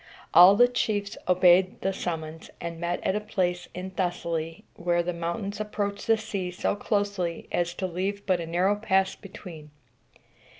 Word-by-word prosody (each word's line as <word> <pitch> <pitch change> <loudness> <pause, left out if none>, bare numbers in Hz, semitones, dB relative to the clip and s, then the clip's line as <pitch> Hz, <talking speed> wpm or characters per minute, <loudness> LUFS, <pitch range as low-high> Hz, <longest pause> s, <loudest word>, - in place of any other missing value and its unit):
All 180 +3 +9
the 245 +4 +6
chiefs 205 -4 -1
obeyed 180 +1 +4
the 195 - 0
summons, 160 -3 -5
and 170 -1 -6
met 175 +1 -2
at 190 - +1
a - - +1
place 180 -4 -2
in 185 +1 -5
Thessaly 170 -3 -3
where 175 0 0
the 180 +1 -2
mountains 170 +5 -4
approach 205 -1 -3
the 225 0 +4
sea 205 -4 -4
so 180 - -1
closely 200 -5 -2
as 175 0 -1
to 190 - -3
leave 190 +3 -3
but 185 -3 +2
a 165 - -5
narrow 180 +5 +2
pass 195 -2 +1
between. 170 -6 -11
185 Hz, 165 wpm, -27 LUFS, 175-200 Hz, -, All